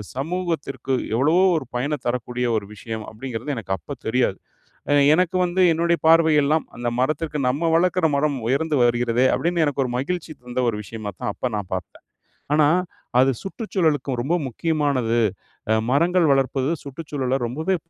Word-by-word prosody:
சமூகத்திற்கு 160 -3 -3 0.2
எவ்வளவோ 155 +9 +3
ஒரு 135 - -4
பயன 145 +5 0
தரக்கூடிய 125 0 -2
ஒரு 100 - -4
விஷயம் 110 +1 -6
அப்டிங்கிறது 130 +4 -5
எனக்கு 95 -3 -3
அப்போ 80 - -8
தெரியாது. 110 -4 +1 0.5
அ - - +3 0.2
எனக்கு 185 0 +1
வந்து 180 +2 -1
என்னுடைய 170 +1 +1
பார்வை 160 -1 +6
எல்லாம் 155 +2 +1
அந்த 120 0 -2
மரத்திற்கு 150 +2 -1
நம்ம 160 +5 0
வளர்க்கிற 180 -1 +2
மரம் 145 -2 0
உயர்ந்து 145 +2 +1
வருகிறதே 120 +1 +2
அப்படின்னு 170 -1 +1
எனக்கு 140 -2 0
ஒரு 120 - -5
மகிழ்ச்சி 165 +4 -3
தந்த 125 +1 -3
ஒரு 105 - -5
விஷயமா 110 -2 -6
தான் 105 - -2
அப்ப 125 - -3
நான் 100 -3 -5
பாத்தேன். 90 -2 -7 0.5
ஆனா 150 -1 +5 0.5
அது 135 +1 +5
சுற்றுச்சூழலுக்கும் 160 - -1
ரொம்ப 160 +7 0
முக்கியமானது. 140 -5 0 0.5
அ - - +5 0.2
மரங்கள் 170 +4 +3
வளர்ப்பது 135 +1 +1
சுற்றுச்சூழல 135 -2 -3
ரொம்பவே 160 +10 -1
140 Hz, 150 wpm, -22 LUFS, 125-165 Hz, 0.5 s, பார்வை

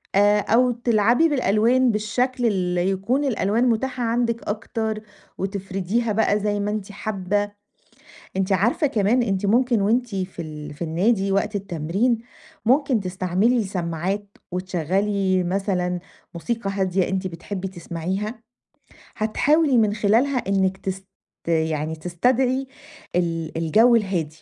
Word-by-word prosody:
آآ 205 +1 +5
أو 245 +4 +3
تلعبي 235 +5 +3
بالألوان 250 -1 +3
بالشكل 245 +4 -1
اللي 180 -4 +1
يكون 215 +9 0
الألوان 230 -1 +1
متاحة 250 +2 -1
عندِك 235 0 0
أكتر 220 0 -3 0.4
وتِفرِديها 195 +3 -2
بَقى 210 -1 +2
زي 205 0 -1
ما 205 +1 -1
أنتِ 210 -1 -4
حابّة. 205 0 -2 0.9
أنتِ 190 +1 0
عارفة 225 - +2
كمان 235 +1 +2
أنتِ 200 -2 -1
ممكن 240 +1 +3
وأنتِ 230 +2 +1
في 185 -2 -4
ال 150 -2 -8
في 155 - -8
النادي 195 +5 +1
وقت 200 +2 0
التمرين، 195 +5 0 0.5
ممكن 260 -1 +3
تستعملي 190 +5 +1
سماعات 185 +2 -3 0.3
وتشغّلي 185 +2 0
مثلًا 180 -1 -1 0.4
موسيقى 210 +4 -3
هادية 190 -2 0
أنتِ 190 0 -2
بتحبّي 185 +2 -5
تسمعيها، 190 +5 -4 0.7
هتحاولي 280 +6 +2
من 215 -2 +3
خلالها 230 +6 +2
إنِّك 190 -1 +1
تست 190 0 -5 0.4
يعني 160 -1 0
تستدعي 250 +11 0 0.5
ال 165 -2 -1
الجَو 220 +9 +4
الهادي. 175 -8 -1
200 Hz, 120 wpm, -23 LUFS, 185-230 Hz, 0.9 s, آآ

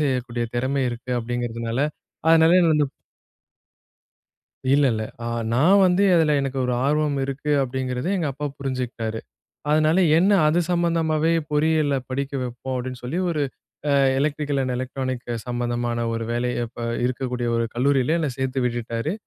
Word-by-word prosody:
செய்யக்கூடிய 125 -4 -1
திறமை 135 +3 0
இருக்கு." 120 +1 -7
அப்படீங்கிறதுனால, 115 0 -3 0.5
அதனால 165 +2 +6
என்ன 170 -2 +4
வந்து 150 -2 +2 1.9
இல்ல 145 - +4
இல்ல. 110 - -2 0.2
அ - - -3 0.3
நான் 180 +10 +5
வந்து 180 +3 +3
அதுல 160 -3 +4
எனக்கு 135 -1 -3
ஒரு 125 - 0
ஆர்வம் 150 0 +1
இருக்கு 140 +2 -4
அப்டிங்கிறத 130 +2 -3
எங்கப்பா 145 -2 -2
புரிஞ்சுக்கிட்டாரு. 125 -5 -3 0.5
அதனால 155 +3 +3 0.2
என்ன 195 +4 +4
அது 155 +3 +3
சம்பந்தமாவே 165 -2 +1 0.2
பொறியியல்ல 150 -1 +2
படிக்க 140 +2 -3
வெப்போம் 125 +1 -5
அப்டினு 125 0 -5
சொல்லி 155 +9 -2
ஒரு 150 -3 -1 0.5
அ - - +3 0.3
எலக்ட்ரிக்கல் 145 -1 0
அண்ட் 130 -1 -1
எலக்ட்ரானிக் 130 0 -4 0.2
சம்மந்தமான 120 -1 -2
ஒரு 115 0 -2
வேலைய 120 0 -1
இப்ப 120 - -7 0.2
இருக்கக்கூடிய 125 -1 -2
ஒரு 115 - +1
கல்லூரியில 135 +4 +2
என்ன 155 - 0
சேர்த்து 130 0 -1
விட்டுட்டாரு. 120 +4 -2
130 Hz, 135 wpm, -23 LUFS, 120-150 Hz, 1.9 s, அதனால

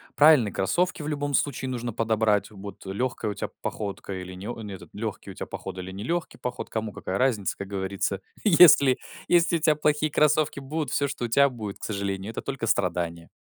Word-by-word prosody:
Правильные 145 -8 +6
кроссовки 175 - 0
в 150 - -5
любом 145 -1 -2
случае 135 -1 0
нужно 120 -1 -3
подобрать 110 -2 +1
вот, 100 -1 -10
легкая 110 +2 -2
у - - -3
тебя - - -4
походка 100 -1 -4
или 95 0 -6
не 95 +3 -8
о 120 - -5
не 105 -2 -6
этот - - -13
легкий 105 -2 -5
у - - -9
тебя - - -6
поход - - -7
или 95 0 -6
нелегкий 125 - -3
поход, 125 - -5
кому 110 -2 -3
какая 95 - -3
разница, 120 -7 +1
как 100 - -6
говорится. 95 0 -2 0.2
Если 160 -8 +7 0.3
если 170 -1 +4
у - - -5
тя 155 -1 +3
плохие 150 +1 +1
кроссовки 150 -1 +2
будут, 145 0 -3
всё, 140 +4 +1
что 130 -3 -3
у - - -1
тя 140 +4 +5
будет, 110 -5 -7
к - - -15
сожалению, 100 0 -3
это - - -5
только 135 -4 -4
страдания. 85 -4 -1
115 Hz, 205 wpm, -26 LUFS, 100-145 Hz, 0.3 s, Если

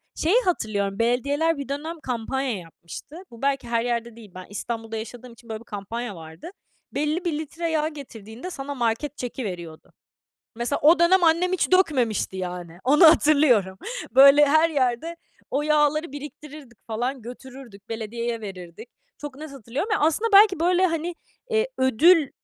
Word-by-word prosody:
Şeyi 340 +7 +1
hatırlıyorum, 205 - -1
belediyeler 280 +7 +1
bir 280 -1 -6
dönem 315 +4 -5
kampanya 255 0 -2
yapmıştı. 170 - -11 0.2
Bu, 235 - -13
belki, 275 -3 0
her 230 -1 0
yerde 235 -1 -2
değil. 220 -4 -14
Ben 185 0 -8
İstanbul'da 225 +2 -5
yaşadığım 240 +2 -9
için 230 0 -19
böyle 220 -1 -4
bir 230 - -16
kampanya 210 +2 -6
vardı. 160 - -10 0.4
Belli 305 +5 -2
bir 310 -3 -1
litre 325 +2 -4
yağ 310 -1 +1
getirdiğinde 250 - -9
sana 285 -4 -6
market 245 +4 -2
çeki 250 0 -5
veriyordu. 170 -5 -8 0.7
Mesela, 240 +4 -1
o 320 +3 +6
dönem 350 +2 +4
annem 335 +3 +3
hiç 370 0 0
dökmemişti, 255 - +2
yani. 180 -2 -6
Onu 295 +7 +5
hatırlıyorum. 280 - +4 0.3
Böyle, 275 +3 +7
her 315 +3 +4
yerde 275 +3 -1 0.3
o 280 - 0
yağları 300 0 +1
biriktirirdik 290 -4 -10
falan, 245 +3 -3
götürürdük, 245 -3 -12
belediyeye 230 +1 -4
verirdik. 190 +1 -9 0.3
Çok 290 -2 -8
net 305 -1 -8
hatırlıyorum. 275 - -5
Aslında, 370 +9 +1
belki, 395 -3 +6
böyle, 360 +2 +3
hani, 330 0 -3 0.4
eee, 445 +2 +1
ödül 290 +5 +4
265 Hz, 150 wpm, -24 LUFS, 225-310 Hz, 0.7 s, Böyle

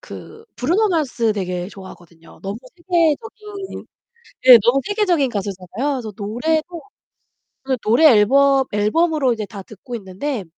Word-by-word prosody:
그 445 +1 -12
브루노 365 - +1
마스 255 - 0
되게 180 -3 -4
좋아하거든요. 175 -4 -15
너무 195 +2 -5 0.2
세계적인 380 +4 -2 0.6
예 250 -2 +11
너무 240 +4 +3
세계적인 370 -9 +1
가수잖아요. 200 +5 -4
그래서 225 -6 -6
노래도 310 - -2 1.0
노래 235 +9 +3
앨범 270 +3 +4
앨범으로 265 +6 +1
이제 220 -2 -5
다 200 -1 -10
듣고 215 +5 -10
있는데 210 +4 -5
250 Hz, 305 characters per minute, -19 LUFS, 205-320 Hz, 1.0 s, 예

